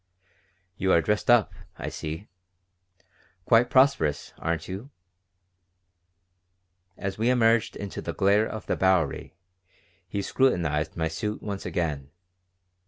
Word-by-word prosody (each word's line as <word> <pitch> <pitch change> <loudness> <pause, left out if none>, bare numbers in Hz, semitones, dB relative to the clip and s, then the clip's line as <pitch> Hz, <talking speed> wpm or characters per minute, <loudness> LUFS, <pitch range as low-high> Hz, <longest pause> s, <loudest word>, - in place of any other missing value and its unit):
"You 95 - +1
are 85 - +5
dressed 105 +8 -1
up, 120 -3 +5 0.2
I - - -4
see. 80 +6 -6 1.2
Quite 120 +2 +4
prosperous, 130 - +2
aren't 85 -1 -2
you?" 100 +8 -7 2.1
As 95 +1 -4
we 115 +2 +2
emerged 115 -2 +3
into 100 -1 -6
the - - -4
glare 100 +3 +3
of 110 - -7
the - - 0
Bowery 95 -6 +1 0.7
he 100 +2 -3
scrutinized 85 - +1
my 80 -1 0
suit 105 +7 -4
once 100 -2 -5
again. 75 -6 -2
100 Hz, 115 wpm, -26 LUFS, 80-110 Hz, 2.1 s, are